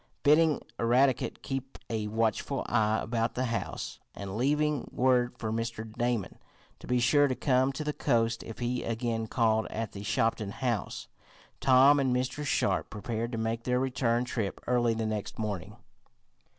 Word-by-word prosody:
Bidding 150 +1 +4 0.2
Eradicate 125 +3 +2
keep 135 -1 -4
a 110 -2 -2
watchful 115 +5 -1
eye 110 0 +2
about 115 0 -1
the 130 - 0
house, 115 -1 -4 0.2
and 100 -1 -6
leaving 150 +3 +1
word 125 -1 +2
for 110 -2 -3
Mr. 115 -1 -4
Damon 120 -5 -1 0.4
to - - -12
be 125 0 +2
sure 145 +4 +4
to 130 - -1
come 130 +1 +2
to 155 - -4
the 150 0 -2
coast 115 -5 +1
if 115 - -8
he 125 0 -1
again 115 -1 -2
called 110 -2 +2
at 115 -1 -4
the 100 - -8
Shopton 105 0 0
house, 120 -7 -2 0.5
Tom 135 +2 +6
and 130 -2 +2
Mr. 130 +4 -2
Sharp 145 - +1
prepared 115 +2 -3
to - - -2
make 115 +1 -1
their 125 +1 +1
return 125 -2 +1
trip 110 -5 -3
early 120 -2 +2
the 110 0 -2
next 110 -2 -3
morning. 105 -2 -4
120 Hz, 165 wpm, -29 LUFS, 110-130 Hz, 0.5 s, Tom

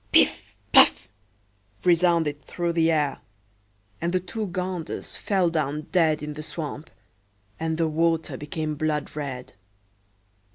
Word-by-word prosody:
"Piff! - - +3
Paff!" - - +6 0.7
resounded 170 -4 +3
through 170 -1 -2
the 165 -1 +3
air; 150 -3 +1 0.8
and 170 +1 0
the 185 - +2
two 205 +4 -4
ganders 180 -2 -4
fell 185 -4 +1
down 150 -2 -1
dead 155 -4 +3
in 150 0 -4
the 150 - -7
swamp, 155 0 -6 0.7
and 160 0 -1
the 165 -1 +2
water 165 +1 +1
became 155 0 -3
blood 150 -1 -2
red. 135 -4 -5
160 Hz, 125 wpm, -25 LUFS, 150-170 Hz, 0.8 s, Paff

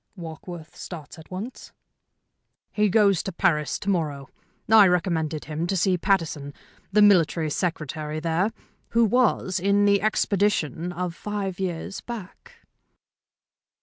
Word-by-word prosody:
"Warkworth 165 0 -9
starts 165 -2 -9
at 160 - -14
once?" 200 +8 -7 1.0
"He 210 -1 +2
goes 200 -3 +4
to 195 - -5
Paris 155 -3 +1
to - - -10
morrow. 150 -7 -2 0.4
I 220 -3 +8
recommended 165 -4 0
him 155 +3 -3
to 195 - 0
see 185 +1 +2
Pattison, 165 -6 -1 0.4
the 210 +1 +5
Military 165 -5 +4
Secretary 155 -2 -3
there, 170 +6 0 0.5
who 235 - +6
was 215 -5 +2
in 200 +2 +3
the 200 -1 +4
expedition 195 -6 0
of 180 0 -3
five 195 -1 -4
years 185 +1 -4
back." 240 - -10
180 Hz, 125 wpm, -25 LUFS, 160-200 Hz, 1.0 s, I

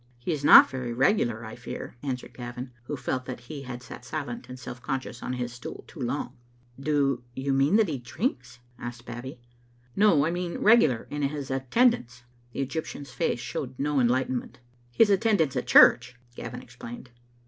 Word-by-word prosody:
"He 120 +8 -3
is 150 -3 -2
not - - +10
very 125 -2 -4
regular, 120 - +1
I 110 - -8
fear," 120 - -7
answered 130 -3 -4
Gavin, 125 +1 -7
who 145 - -4
felt 130 0 -3
that 125 -2 -6
he 140 +4 -8
had 125 -2 -7
sat 120 0 -10
silent 155 - -5
and 125 - -7
self 125 -1 -8
conscious 130 -2 -4
on 125 - -3
his 125 -1 -3
stool 120 - -8
too 165 - -14
long, 130 +3 -3 0.2
" 120 +1 -25
Do 140 -3 +1
you 135 +1 -1
mean 135 +7 +3
that 220 -2 +4
he 145 -5 -3
drinks?" 125 - -3 0.2
asked 120 0 -7
Babbie. 120 +2 -7 0.3
" 120 0 -33
No, 185 -9 +5
I 165 - 0
mean 175 0 -3
regular 180 - +4
in 145 0 -3
his 140 -1 -2
attendance." 135 - +1 0.3
The 140 - -3
Egyptian's 140 -1 -5
face 125 0 -1
showed 130 +1 -5
no 145 0 +1
enlightenment. 130 0 0 0.2
" 120 0 -34
His 220 -2 +6
attendance 195 - +2
at - - -2
church," 125 0 +6 0.2
Gavin - - -7
explained. 120 +1 -10
130 Hz, 185 wpm, -27 LUFS, 120-145 Hz, 0.3 s, not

